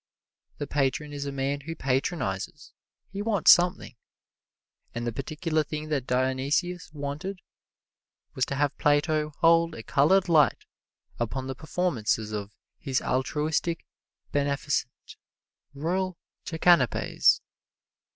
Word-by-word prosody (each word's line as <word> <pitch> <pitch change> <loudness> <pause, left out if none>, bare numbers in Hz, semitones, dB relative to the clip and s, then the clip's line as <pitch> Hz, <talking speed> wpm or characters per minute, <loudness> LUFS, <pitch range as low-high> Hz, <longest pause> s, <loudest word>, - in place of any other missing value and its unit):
The 145 - -3
patron 145 +1 -1
is 140 0 -4
a - - -3
man 140 +1 -2
who 165 +3 -6
patronizes 130 - -2 0.4
he 200 +1 -4
wants 205 -5 +5
something, 175 -6 +3 1.0
and 120 0 -3
the 120 - -1
particular 155 +4 -1
thing 155 +1 -6
that 140 -4 -1
Dionysius 135 +8 0
wanted 150 +6 -5 0.9
was 130 - 0
to 140 - -3
have 145 0 0
Plato 150 +1 +2
hold 165 0 +4
a 115 - -8
colored 180 +10 +3
light 155 -4 +3 0.5
upon 130 +3 -2
the 135 - -3
performances 125 -8 -1
of 105 -1 -4 0.3
His 130 -2 0
Altruistic, 150 +5 -1 0.5
Beneficent, 140 -2 -2 0.6
Royal 180 +5 -1 0.3
Jackanapes. 160 - +3
145 Hz, 110 wpm, -27 LUFS, 130-165 Hz, 1.0 s, wants